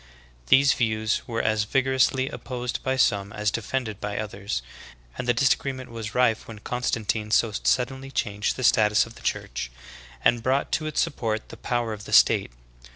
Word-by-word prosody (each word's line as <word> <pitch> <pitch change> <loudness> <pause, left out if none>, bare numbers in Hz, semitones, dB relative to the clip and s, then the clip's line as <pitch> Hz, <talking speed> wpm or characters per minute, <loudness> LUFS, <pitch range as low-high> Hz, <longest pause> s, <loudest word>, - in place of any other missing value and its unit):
These 140 - +6
views 110 -2 0
were 115 -1 -2
as 110 -1 +2
vigorously 130 +2 +2
opposed 125 -2 -4
by 130 0 0
some 100 -5 +2
as 105 0 -1
defended 115 -1 -3
by 105 -1 -3
others, 100 - -4 0.5
and 125 - -5
the - - +5
disagreement 130 0 0
was 115 -1 -6
rife 125 -3 +2
when 115 - -9
Con 125 +4 -4
stantine 110 -2 -1
so 110 0 +3
suddenly 130 +5 0
changed 105 -5 -1
the 130 - -5
status 105 -2 +4
of 115 - -12
the - - -15
Church, - - -3 0.6
and 120 -1 +4
brought 130 +3 0
to 155 - 0
its 155 - 0
support 115 -9 -2
the - - -9
power 120 -2 -1
of 105 0 -9
the - - -7
state. - - +5
115 Hz, 175 wpm, -25 LUFS, 105-130 Hz, 0.6 s, These